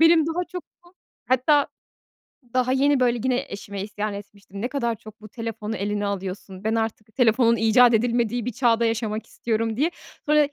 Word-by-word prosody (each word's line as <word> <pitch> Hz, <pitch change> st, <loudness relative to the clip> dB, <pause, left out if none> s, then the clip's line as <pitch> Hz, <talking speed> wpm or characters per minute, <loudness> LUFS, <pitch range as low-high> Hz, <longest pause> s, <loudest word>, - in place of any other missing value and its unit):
Benim 325 Hz, -1 st, +6 dB
daha 330 Hz, +2 st, -1 dB
çok 360 Hz, -1 st, -4 dB, 0.2 s
bu, 350 Hz, +1 st, -21 dB, 0.3 s
hatta 275 Hz, +3 st, +3 dB, 0.9 s
daha 255 Hz, 0 st, +2 dB
yeni 280 Hz, +1 st, +3 dB
böyle 245 Hz, -1 st, +3 dB
gine 255 Hz, +2 st, 0 dB
eşime 200 Hz, -1 st, -6 dB
isyan 210 Hz, 0 st, -3 dB
etmiştim, 200 Hz, 0 st, -9 dB
ne 245 Hz, -, 0 dB
kadar 235 Hz, -5 st, -1 dB
çok 215 Hz, 0 st, -14 dB
bu 215 Hz, -, -11 dB
telefonu 225 Hz, -1 st, -5 dB
eline 205 Hz, +1 st, -1 dB
alıyorsun, 190 Hz, -1 st, -5 dB
ben 220 Hz, +1 st, +1 dB
artık 220 Hz, -1 st, -3 dB
telefonun 235 Hz, -1 st, +4 dB
icat 235 Hz, +2 st, +5 dB
edilmediği 235 Hz, 0 st, +1 dB
bir 250 Hz, -, -1 dB
çağda 235 Hz, -1 st, +3 dB
yaşamak 225 Hz, -1 st, -1 dB
istiyorum 225 Hz, -1 st, -2 dB
diye. 310 Hz, +6 st, +2 dB, 0.4 s
Sonra 300 Hz, -1 st, +5 dB
230 Hz, 170 wpm, -24 LUFS, 215-255 Hz, 0.9 s, Benim